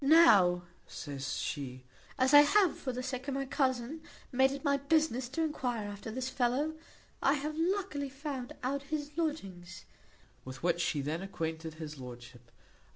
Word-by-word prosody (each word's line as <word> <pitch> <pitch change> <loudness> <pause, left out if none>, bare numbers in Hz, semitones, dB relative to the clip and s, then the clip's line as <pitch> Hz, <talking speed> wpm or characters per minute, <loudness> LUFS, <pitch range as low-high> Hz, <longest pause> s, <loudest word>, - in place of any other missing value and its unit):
"Now," 205 - +7 0.2
says 135 -3 -5
she, 130 -4 -4 0.3
"as 260 +2 +3
I 290 - +12
have, 370 +4 +4
for 260 - -4
the 250 +1 -4
sake 255 +1 -4
of 275 - -1
my 275 0 -1
cousin, 260 +2 0 0.3
made 265 +1 +4
it 275 +1 -5
my 280 -2 +3
business 280 -4 +1
to 320 +5 -1
enquire 250 -8 -2
after 205 +2 -7
this 255 +3 -3
fellow, 260 +4 +1 0.5
I 275 - +4
have 300 +1 -2
luckily 335 -4 -1
found 270 -1 -5
out 275 +2 0
his 300 -1 -2
lodgings;" 195 - -4 0.6
with 130 +2 -9
which 175 0 +2
she 150 -3 0
then 155 +5 -2
acquainted 160 -4 -4
his 155 -3 -7
lordship. 120 -1 -10
255 Hz, 160 wpm, -32 LUFS, 175-290 Hz, 0.6 s, I